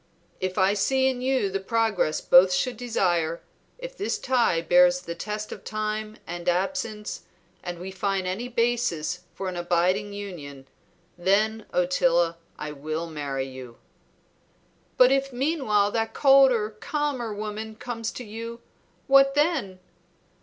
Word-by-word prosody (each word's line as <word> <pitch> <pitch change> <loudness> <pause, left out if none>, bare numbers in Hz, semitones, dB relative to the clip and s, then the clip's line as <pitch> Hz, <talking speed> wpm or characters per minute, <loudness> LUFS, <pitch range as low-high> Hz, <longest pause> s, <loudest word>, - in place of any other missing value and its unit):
"If 185 +1 -3
I 190 0 +4
see 265 +6 +2
in 255 -2 -1
you 255 -6 +1
the 195 - -1
progress 215 -5 0
both 180 +1 +6
should 210 +8 0
desire, 175 -8 0 0.3
if - - -8
this 410 -3 -2
tie 245 -10 +2
bears 180 +1 +4
the 170 -1 -6
test 210 +4 -5
of - - -8
time 215 0 -3
and 175 +1 -3
absence, 210 +3 -2 0.4
and 175 -1 -6
we 185 +2 -7
find 195 0 -1
any 190 +7 -3
basis 230 -9 0 0.2
for 195 - -4
an 185 - -4
abiding 180 +4 +1
union, 155 -10 -8 0.5
then, 215 +4 +1
Ottila, 175 -1 +2 0.2
I 150 - -5
will 155 +3 -4
marry 140 -3 -3
you." 130 -3 -10 1.2
"But 255 0 +7
if 275 0 +1
meanwhile 245 -7 +1
that 225 0 -2
colder, 270 -6 +5
calmer 260 +1 -3
woman 215 +1 -5
comes 230 -1 -4
to 250 - -7
you, 230 +1 -7 0.5
what 275 0 +5
then?" 290 - 0
210 Hz, 140 wpm, -25 LUFS, 175-240 Hz, 1.2 s, But